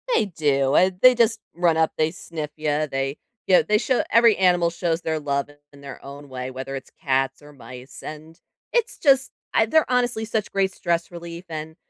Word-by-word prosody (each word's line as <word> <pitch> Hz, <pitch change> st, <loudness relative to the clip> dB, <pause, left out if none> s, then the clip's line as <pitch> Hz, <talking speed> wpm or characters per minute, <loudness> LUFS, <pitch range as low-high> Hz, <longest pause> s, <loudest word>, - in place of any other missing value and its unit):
They -, -, +3 dB
do, 145 Hz, -6 st, +1 dB
and 185 Hz, 0 st, +3 dB
they 255 Hz, 0 st, +8 dB
just 230 Hz, -1 st, +2 dB, 0.2 s
run 170 Hz, -2 st, +2 dB
up, 160 Hz, 0 st, +2 dB
they 155 Hz, 0 st, +1 dB
sniff 160 Hz, -4 st, -7 dB
ya, 155 Hz, 0 st, -1 dB
they 135 Hz, +1 st, -2 dB, 0.3 s
yeah, 185 Hz, -, +5 dB
they 210 Hz, -, +4 dB
show 255 Hz, +3 st, +1 dB
every 230 Hz, -2 st, +6 dB
animal 175 Hz, -2 st, +3 dB
shows 170 Hz, 0 st, -2 dB
their 160 Hz, -2 st, -2 dB
love 140 Hz, -1 st, -2 dB
in 145 Hz, -, -17 dB, 0.2 s
in 140 Hz, -, -16 dB
their 140 Hz, -1 st, -10 dB
own 140 Hz, +1 st, -10 dB
way, 130 Hz, 0 st, -5 dB
whether 130 Hz, +1 st, -6 dB
it's 135 Hz, -, -8 dB
cats 135 Hz, -1 st, 0 dB
or 145 Hz, 0 st, -14 dB
mice, 130 Hz, -1 st, -12 dB
and 155 Hz, +2 st, -10 dB, 0.3 s
it's 475 Hz, -1 st, 0 dB
just 270 Hz, -3 st, +3 dB, 0.2 s
I 220 Hz, -, +4 dB
they're 315 Hz, +6 st, +2 dB
honestly 245 Hz, -3 st, +1 dB
such 220 Hz, -2 st, -2 dB
great 195 Hz, -1 st, 0 dB
stress 170 Hz, 0 st, -2 dB
relief, 170 Hz, 0 st, -8 dB
and 155 Hz, 0 st, -6 dB
160 Hz, 200 wpm, -23 LUFS, 140-195 Hz, 0.3 s, they